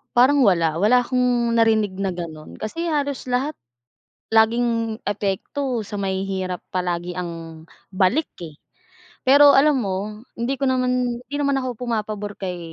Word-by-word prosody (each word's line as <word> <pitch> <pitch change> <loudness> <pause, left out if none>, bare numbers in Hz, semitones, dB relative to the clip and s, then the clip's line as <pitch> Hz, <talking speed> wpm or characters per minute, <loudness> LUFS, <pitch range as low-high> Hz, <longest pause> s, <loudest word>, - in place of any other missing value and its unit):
Parang 260 +4 +5
wala, 165 -4 +2
wala 245 +6 +4
akong 245 -1 +1
narinig 215 -4 +2
na 195 - 0
ganun. 160 -3 -8
Kasi 330 +11 -4
halos 285 -5 -2
lahat 255 +4 0 0.8
laging 230 0 +2
epekto 210 +4 -2
sa 210 - -8
mahihirap 190 -2 -2 0.2
palagi 175 -1 -2
ang 165 -2 -7 0.3
balik 200 +12 +2 0.2
eh. 155 -3 -9 0.7
Pero 285 +1 +7
alam 295 +2 +5
mo, 205 +2 -4 0.2
hindi 240 +4 -1
ko 275 -1 0
naman 250 -1 0
hindi 250 +3 -11
naman 280 -1 +1
ako 255 -2 -3
pumapabor 210 -3 -3
kay 180 -2 -4
220 Hz, 135 wpm, -22 LUFS, 190-255 Hz, 0.8 s, Pero